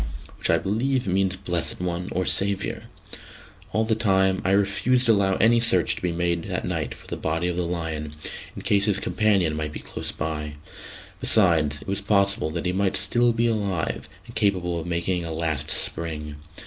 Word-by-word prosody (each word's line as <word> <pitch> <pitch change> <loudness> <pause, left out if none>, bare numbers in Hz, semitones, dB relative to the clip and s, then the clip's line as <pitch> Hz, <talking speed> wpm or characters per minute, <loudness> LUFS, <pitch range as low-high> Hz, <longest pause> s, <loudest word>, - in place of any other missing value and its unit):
which - - +1
I - - +5
believe 120 +6 0
means 95 0 +1
"blessed 85 -4 +1
one" 90 0 -3
or 90 +1 -1
"saviour." 100 +2 0 0.9
All 110 +1 +1
the 110 0 0
same, 95 -2 +3
I 95 - 0
refused 100 +6 +2
to 115 - +6
allow 100 -3 +2
any 115 +2 +4
search 105 -7 +3
to - - -8
be 90 - -1
made 85 0 -1
that - - -3
night - - -3
for - - -16
the - - -5
body 80 +2 -1
of 90 - -2
the 90 - -1
lion, 80 -3 -3 0.4
in - - -8
case 100 -1 +2
his 105 -2 +2
companion 95 -7 +1
might 75 -1 -3
be - - -6
close - - -6
by; 75 -1 -4 0.7
besides, 80 -8 +3
it - - -18
was 100 +1 -2
possible 100 -4 +1
that 85 +3 -4
he 90 - 0
might 95 0 +1
be - - +5
still 120 0 +4
alive, 110 -7 -1 0.2
and - - -12
capable 90 -4 0
of 80 - -6
making 85 +1 -1
a 80 - -4
last 80 -2 -2
spring. 75 -2 -2
95 Hz, 190 wpm, -24 LUFS, 85-100 Hz, 0.9 s, to